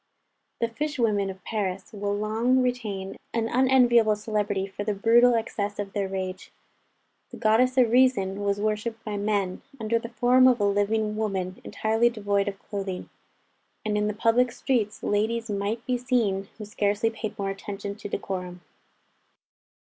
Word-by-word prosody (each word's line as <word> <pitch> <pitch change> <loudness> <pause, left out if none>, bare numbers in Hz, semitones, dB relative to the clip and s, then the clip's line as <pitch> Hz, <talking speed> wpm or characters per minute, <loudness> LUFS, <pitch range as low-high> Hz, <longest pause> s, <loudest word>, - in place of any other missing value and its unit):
The 230 - +3
fish 295 +6 -4
women 210 -5 +1
of 190 -1 -9
Paris 195 -1 -3
will 205 -1 -2
long 230 +5 +2
retain 215 -6 -3 0.2
an 225 -1 +1
unenviable 240 -3 +4
celebrity 210 -2 -1
for 200 +1 -6
the 210 0 -1
brutal 235 +4 +5
excess 210 -2 -2
of 200 -1 -5
their 200 -2 -1
rage. 185 0 -5 0.8
The - - -10
goddess 245 +4 +3
of 245 -3 +5
Reason 230 -6 +3
was 200 0 0
worshipped 215 +2 -2
by 210 -2 -3
men, 200 -3 -1 0.2
under 225 +1 +1
the 230 - -7
form 250 +2 +5
of 250 -2 +4
a - - +1
living 210 +2 +1
woman 190 -4 -2
entirely 225 +2 +1
devoid 205 -3 0
of 200 -1 -3
clothing; 195 -3 -5 0.7
and 210 -1 0
in 210 0 +1
the 210 - -2
public 235 +3 +3
streets 230 -5 -1
ladies 220 +2 0
might 205 +3 -2
be 250 -1 0
seen 225 -6 0
who 215 - -7
scarcely 205 +2 0
paid 220 -1 -6
more 195 -1 -2
attention 200 +1 -6
to 205 - -7
decorum. 180 -2 -4
215 Hz, 160 wpm, -26 LUFS, 200-230 Hz, 0.8 s, brutal